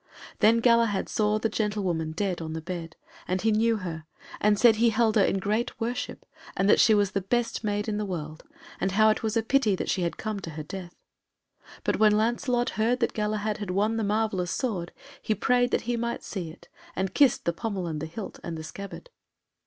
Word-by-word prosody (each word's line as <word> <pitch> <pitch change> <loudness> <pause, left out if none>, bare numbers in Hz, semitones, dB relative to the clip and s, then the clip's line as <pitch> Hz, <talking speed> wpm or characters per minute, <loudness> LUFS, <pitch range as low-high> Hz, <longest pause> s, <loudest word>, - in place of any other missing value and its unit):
Then 230 +2 +5
Galahad 230 -4 +3
saw 210 0 +1
the 220 - 0
gentlewoman 195 -7 -1
dead 185 0 -2
on 160 -1 -5
the 160 - -3
bed, 170 -1 -6 0.3
and 185 - 0
he 220 +3 +2
knew 225 +1 +2
her, 165 -5 -6 0.3
and 210 0 +3
said 225 0 +6
he 235 +1 +4
held 225 0 +2
her 205 - +5
in 195 - +1
great 210 +5 -1
worship, 240 +2 -4 0.3
and 195 - +2
that - - +5
she 220 - +6
was 205 -2 +2
the 195 - -1
best 235 +5 -1
maid 205 0 -1
in 210 -1 -1
the 210 - -1
world, 155 -4 -5 0.4
and 190 - 0
how 215 +2 +5
it - - -2
was 220 0 -1
great 225 -1 0
pity 250 -8 +3
that - - -2
she 185 - 0
had 170 -1 -2
come 215 -2 -3
to 175 - -7
her 155 -1 -6
death. 175 +2 -8 0.9
But - - 0
when 210 -1 +5
Lancelot 240 +2 +1
heard 240 +3 +2
that 235 - 0
Galahad 210 0 -1
had 205 -3 -5
won 210 +5 +1
the 225 - 0
marvellous 205 -4 0
sword 185 -10 -2 0.3
he 215 - 0
prayed 245 +3 +2
that - - +1
he 240 +1 -2
might 235 0 -3
see 180 -6 -5
it, 170 +2 -14 0.3
and 190 0 -2
kissed 280 -4 +4
the 170 - +1
pommel 200 -1 -3
and 155 -3 -4
the 160 - -3
hilt, 195 +5 -7
and 170 -1 -5
the 160 - -6
scabbard. 200 - -9
210 Hz, 220 wpm, -27 LUFS, 185-225 Hz, 0.9 s, said